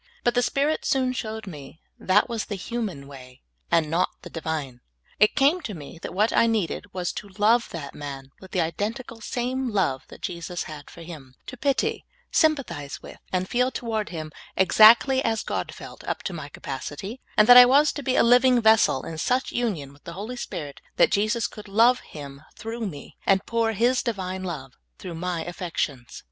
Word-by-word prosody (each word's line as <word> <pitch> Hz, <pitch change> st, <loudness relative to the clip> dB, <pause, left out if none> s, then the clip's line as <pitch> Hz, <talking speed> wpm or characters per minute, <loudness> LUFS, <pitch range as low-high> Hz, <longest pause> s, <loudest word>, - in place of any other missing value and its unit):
But 240 Hz, -, +2 dB
the 245 Hz, -, +3 dB
Spirit 285 Hz, +5 st, 0 dB
soon 260 Hz, -3 st, +1 dB
showed 220 Hz, -3 st, -5 dB
me 150 Hz, -4 st, -10 dB, 0.2 s
that 190 Hz, +3 st, +3 dB
was 230 Hz, -2 st, -3 dB
the 205 Hz, -, -4 dB
human 195 Hz, -8 st, -4 dB
w^ay, 130 Hz, -2 st, -13 dB, 0.3 s
and 165 Hz, -2 st, +3 dB
not 165 Hz, +4 st, +1 dB
the -, -, -10 dB
Divine. 150 Hz, -6 st, -4 dB, 0.4 s
It 210 Hz, -, +5 dB
came 290 Hz, +6 st, +3 dB
to 215 Hz, -, -6 dB
me 160 Hz, +1 st, -10 dB
that -, -, -6 dB
what 210 Hz, +4 st, +1 dB
I 230 Hz, -, +4 dB
needed 205 Hz, -2 st, -1 dB
was 180 Hz, -2 st, -2 dB
to 205 Hz, -, -7 dB
love 230 Hz, +3 st, +3 dB
that 145 Hz, -5 st, -7 dB
man 135 Hz, -2 st, -8 dB
with 190 Hz, -, -13 dB
the 185 Hz, -, 0 dB
identical 225 Hz, +8 st, -4 dB
same 250 Hz, +3 st, -2 dB
love 185 Hz, -, 0 dB
that -, -, -14 dB
Jesus 175 Hz, -1 st, -4 dB
had 150 Hz, -2 st, -9 dB
for 170 Hz, -, -11 dB
him; 145 Hz, -6 st, -11 dB
to -, -, -8 dB
pity, 275 Hz, +2 st, 0 dB, 0.3 s
sympathize 275 Hz, -, 0 dB
with, -, -, -11 dB
and 185 Hz, 0 st, 0 dB
feel 250 Hz, +3 st, +1 dB
toward 225 Hz, -4 st, -3 dB
him 155 Hz, -3 st, -6 dB, 0.3 s
exactly 225 Hz, +8 st, +6 dB
as 225 Hz, -1 st, 0 dB
God -, -, -3 dB
felt, -, -, -11 dB
up -, -, -3 dB
to 190 Hz, -, -4 dB
my 155 Hz, -4 st, -7 dB
capacity; 145 Hz, -, -6 dB, 0.2 s
that 220 Hz, +4 st, +8 dB
I 250 Hz, 0 st, +12 dB
w^as 285 Hz, +4 st, +4 dB
to 290 Hz, -, -5 dB
be 260 Hz, -2 st, 0 dB
a -, -, +5 dB
living 245 Hz, +1 st, +5 dB
vessel 220 Hz, -, +4 dB
in 160 Hz, -1 st, -6 dB
such 250 Hz, +9 st, 0 dB
union 180 Hz, -, -2 dB
with 140 Hz, -, -22 dB
the 170 Hz, -, -7 dB
Holy 210 Hz, +7 st, -6 dB
Spirit 150 Hz, -, -6 dB
that -, -, +4 dB
Jesus 215 Hz, +3 st, +1 dB
could 210 Hz, -1 st, -7 dB
love 230 Hz, +5 st, +4 dB
him 140 Hz, -2 st, -10 dB
through 225 Hz, 0 st, -5 dB
me, 145 Hz, -6 st, -10 dB
and 195 Hz, -1 st, +3 dB
pour 230 Hz, -1 st, 0 dB
His 245 Hz, +4 st, +2 dB
Divine 190 Hz, -5 st, -3 dB
love 150 Hz, -8 st, -5 dB, 0.3 s
through 180 Hz, -3 st, -7 dB
my 175 Hz, 0 st, -3 dB
affections. 165 Hz, -8 st, -4 dB
200 Hz, 190 wpm, -25 LUFS, 160-235 Hz, 0.4 s, I